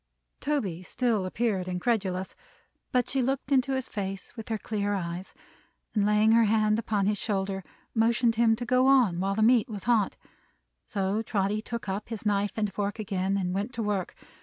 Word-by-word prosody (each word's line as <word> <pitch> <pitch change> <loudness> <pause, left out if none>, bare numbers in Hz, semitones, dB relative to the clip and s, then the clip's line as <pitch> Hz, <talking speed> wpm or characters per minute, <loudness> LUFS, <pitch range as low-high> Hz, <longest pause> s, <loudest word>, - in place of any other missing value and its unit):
Toby 220 - -1
still 220 -1 0
appeared 195 -3 -1
incredulous; 190 -1 -1 0.6
but 250 -1 +2
she 270 - 0
looked 265 +2 -1
into 265 0 +3
his 260 -1 -2
face 195 0 -5
with 225 -2 -8
her 220 - 0
clear 205 -1 -2
eyes, 175 0 -5 0.6
and 205 -2 +2
laying 210 +1 +4
her 230 0 +6
hand 215 0 +3
upon 210 -3 0
his 205 0 +1
shoulder, 195 -2 -2 0.3
motioned 235 +1 +3
him 225 0 +4
to 240 +2 -5
go 255 +1 +3
on 245 -11 +4
while 195 +1 0
the 215 - +2
meat 240 +1 +4
was 205 -3 -5
hot. 225 -5 +2 0.7
So 195 +2 -1
Trotty 210 -1 0
took 235 -1 -6
up 195 +3 -3
his 225 -2 -6
knife 205 0 +1
and 210 -3 -1
fork 205 0 -2
again, 195 -2 -1
and 180 -2 -1
went 205 +6 -2
to 230 - -2
work. 205 -3 -2
210 Hz, 185 wpm, -28 LUFS, 195-235 Hz, 0.7 s, her